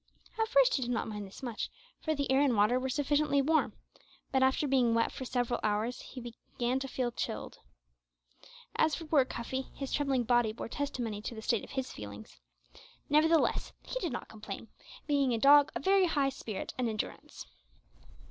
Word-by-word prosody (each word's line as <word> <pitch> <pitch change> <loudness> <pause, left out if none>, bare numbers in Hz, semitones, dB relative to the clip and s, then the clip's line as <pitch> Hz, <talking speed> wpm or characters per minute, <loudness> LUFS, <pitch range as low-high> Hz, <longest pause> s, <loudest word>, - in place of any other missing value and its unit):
At 445 - +2
first - - +5
he 270 - +1
did 245 - -2
not 245 - -1
mind 210 -2 -5
this 190 - -13
much, 235 -4 -3 0.3
for 315 -1 -1
the 280 -2 -1
air 265 +1 +4
and 275 -5 +3
water 215 +5 +4
were 265 +1 -2
sufficiently 290 +1 +2
warm, 310 +3 +2 0.6
but 265 - +2
after 265 +3 +3
being 250 -4 +3
wet 230 - +2
for 260 - -6
several 245 -1 0
hours 215 +3 -1
he 260 - -9
began 240 +1 -3
feel 260 -2 -2
chilled. - - -4 1.2
As 310 -2 +3
for 330 - -7
poor 295 -4 +4
Cuffy, 260 +2 -4
his 275 -2 -5
trembling 275 -4 +1
body 240 -2 +2
bore 225 - -6
testimony 240 -6 -3
to 230 - -5
the 220 - -7
state 230 -2 +1
of - - -10
his 265 -2 -3
feelings; 105 - -10 0.7
nevertheless 315 +2 +3
he - - -4
did 345 - -2
not 240 - -5
complain, 215 0 -8 0.4
being 280 -4 +2
a - - 0
dog 285 +4 +7
of - - -4
high 360 -8 +4
spirit 230 -6 -6
and 245 -2 +1
endurance. 215 -1 -5
260 Hz, 180 wpm, -31 LUFS, 230-285 Hz, 1.2 s, dog